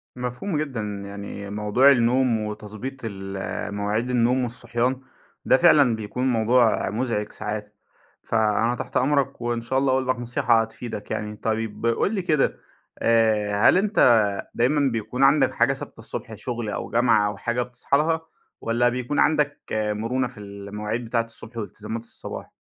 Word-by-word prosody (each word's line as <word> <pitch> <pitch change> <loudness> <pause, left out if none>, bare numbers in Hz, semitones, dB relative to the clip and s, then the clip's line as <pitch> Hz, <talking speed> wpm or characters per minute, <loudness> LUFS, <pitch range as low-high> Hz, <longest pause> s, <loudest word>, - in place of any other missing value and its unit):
مفهوم 125 +8 -3
جدًا، 135 -7 -2 0.2
يعني 100 0 -7
موضوع 105 +6 +3
النوم 125 -2 +3
وتضبيط 105 +4 -6
ال 95 0 -5
مواعيد 105 +4 -1
النوم 125 +1 +2
والصحيان 120 +2 -2 0.4
ده - - +5
فعلًا 145 -7 +5
بيكون 110 +4 -3
موضوع 115 -1 +3
مزعِج 105 -1 -2
ساعات، 105 0 -5 0.5
فأنا 110 +1 +1
تحت - - -3
أمرك، 140 -2 +1
وإن 120 -1 -1
شاء 130 +3 0
الله 135 -1 +2
أقول 130 0 +1
لك 130 -1 0
نصيحة 120 -1 +2
هتفيدك 110 -1 -6
يعني. 105 0 -3
طيب 110 0 -3
قُل 115 - +1
لي 195 - 0
كده 155 -5 +1 0.4
آآ، 110 -2 +3
هل - - +5
أنت 190 - +5 0.3
دايمًا 135 +2 +2
بيكون 115 +4 -2
عندك 135 +1 +4
حاجة - - +3
ثابتة - - -9
الصبح - - -6
شغل 120 -3 -4
أو 105 - -4
جامعة 115 -3 +3
أو 105 -1 -4
حاجة 120 +1 -1
بتصحى 125 +3 0
لها، 160 +2 +1 0.4
والَّا 120 +1 +2
بيكون 125 +3 -2
عندك 150 -1 +2
مرونة 110 +4 -1
في 120 -3 -13
المواعيد 105 +3 -5
بتاعة 115 0 0
الصبح 115 0 -9
والتزامات 110 +1 -5
الصباح؟ 115 - -7
115 Hz, 150 wpm, -24 LUFS, 105-130 Hz, 0.5 s, ده